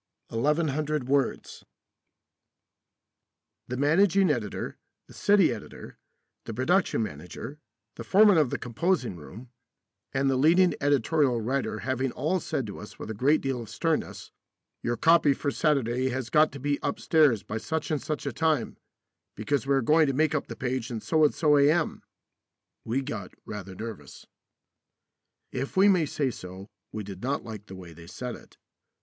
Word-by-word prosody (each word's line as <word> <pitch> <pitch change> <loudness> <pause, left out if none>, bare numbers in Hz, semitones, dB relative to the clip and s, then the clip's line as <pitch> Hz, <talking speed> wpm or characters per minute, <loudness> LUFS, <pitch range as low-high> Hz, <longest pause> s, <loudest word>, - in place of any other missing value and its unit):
1100 150 +2 0
WORDS 140 -1 -1 2.0
The 125 - -4
managing 180 +5 +4
editor, 110 -7 -4 0.3
the - - -16
city 200 -7 +3
editor, 110 - -10 0.5
the 115 - -6
production 155 - +1
manager, 90 - -8 0.4
the - - -6
foreman 200 -3 +5
of 150 -5 +2
the - - -2
composing 125 - -1
room, 110 +10 -12 0.6
and 135 0 0
the 135 -1 +2
leading 170 +6 +4
editorial 140 -2 +2
writer 130 +5 -2
having 130 0 -1
all 185 - 0
said 155 -6 -3
to 100 - -8
us 105 - -11
with 110 - -6
a - - -3
great 140 +8 +2
deal 135 -3 -2
of 110 - -9
sternness, - - -2 0.5
"Your 120 0 -1
copy 160 -1 +4
for 140 - -2
Saturday 130 -4 +1
has 130 -1 -4
got 155 0 +5
to 140 - -7
be 145 +1 -1
upstairs 155 - +2
by 110 - -4
such 160 +7 -3
and 150 - 0
such 150 -1 -4
a 140 - -2
time, 155 -4 0 0.6
because 135 +6 -1
we 140 - +3
are 135 - +1
going 155 +4 +4
to 135 - 0
make 155 +2 +2
up 155 - -1
the - - -7
page 130 -1 -3
at 115 -2 -5
so 160 -1 +2
and 150 - +3
so 150 -3 +4
A.M.," 155 +4 +2 0.8
we 130 +5 -1
got 110 -9 -6
rather 100 -3 -7
nervous. 110 +1 -8 1.3
If 135 +7 -4
we 195 +2 +6
may 180 -6 +4
say 140 -2 -1
so, 95 -2 -9 0.3
we 110 - -5
did 95 -1 -9
not 135 +3 -2
like 110 -3 -9
the 95 - -9
way 90 -3 -11
they 85 +1 -13
said 125 +7 -6
it. - - -14
135 Hz, 165 wpm, -27 LUFS, 115-155 Hz, 2.0 s, we